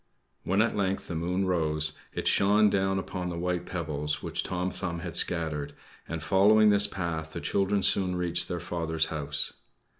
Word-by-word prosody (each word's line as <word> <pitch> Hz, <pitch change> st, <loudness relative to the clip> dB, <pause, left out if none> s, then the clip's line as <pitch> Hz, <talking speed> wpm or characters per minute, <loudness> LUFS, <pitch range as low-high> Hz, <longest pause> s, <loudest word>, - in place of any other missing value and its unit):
When 100 Hz, +4 st, +2 dB
at 115 Hz, -, -2 dB
length 95 Hz, -2 st, -2 dB
the -, -, -5 dB
moon 90 Hz, +4 st, -1 dB
rose, 80 Hz, -4 st, 0 dB, 0.2 s
it -, -, -4 dB
shone 105 Hz, +1 st, +3 dB
down 95 Hz, 0 st, 0 dB
upon 90 Hz, -1 st, -4 dB
the 85 Hz, -, -5 dB
white 90 Hz, 0 st, -3 dB
pebbles 75 Hz, -4 st, -4 dB
which -, -, -1 dB
Tom 90 Hz, 0 st, -3 dB
Thumb 85 Hz, -3 st, -5 dB
had -, -, -6 dB
scattered; 80 Hz, -4 st, +2 dB, 0.3 s
and, 80 Hz, -2 st, -5 dB
following 105 Hz, +4 st, +4 dB
this 100 Hz, 0 st, +7 dB
path, 80 Hz, -5 st, -5 dB
the -, -, -5 dB
children 100 Hz, 0 st, 0 dB
soon 90 Hz, -2 st, +2 dB
reached 90 Hz, -1 st, 0 dB
their 90 Hz, -1 st, -4 dB
father's 80 Hz, -2 st, -2 dB
house. 70 Hz, -2 st, +2 dB
90 Hz, 175 wpm, -27 LUFS, 80-95 Hz, 0.3 s, this